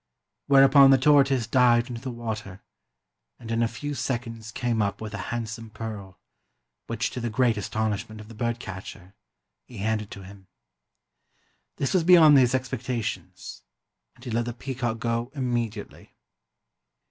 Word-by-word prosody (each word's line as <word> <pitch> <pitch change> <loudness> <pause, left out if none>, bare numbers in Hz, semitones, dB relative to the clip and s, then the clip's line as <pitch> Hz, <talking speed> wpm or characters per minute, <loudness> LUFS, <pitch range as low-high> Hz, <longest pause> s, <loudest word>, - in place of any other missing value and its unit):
Whereupon 135 0 +7
the 135 - +7
tortoise 135 -3 +4
dived 120 0 +3
into 120 -2 -7
the 135 - -5
water 110 -5 -6 0.7
and 115 -2 -9
in 115 0 0
a 115 - +3
few 145 +6 -5
seconds 115 -4 -4
came 120 -1 -1
up 100 -1 -1
with 110 -1 -7
a - - -4
hand 115 0 -3
some 115 0 -8
pearl, 105 -4 -8 0.7
which, 115 0 -2
to - - -5
the 120 -1 -2
great 115 +1 +2
astonishment 110 +1 -3
of 105 - -11
the 115 - -12
bird 115 +1 -2
catcher, 95 -2 -9 0.5
he 120 - -12
handed 105 0 -2
to 100 - -10
him. 95 0 -14 1.3
This 135 - -2
was 185 -3 +3
beyond 165 -4 +7
his 130 -2 +4
expecta 130 -2 -3
tions, - - -7 0.5
and 120 - -19
he 125 - -5
let 115 +1 0
the 120 - -4
peacock 120 -2 -4
go 115 +2 -2
immediately. 120 -5 -4
115 Hz, 160 wpm, -25 LUFS, 110-130 Hz, 1.3 s, Whereupon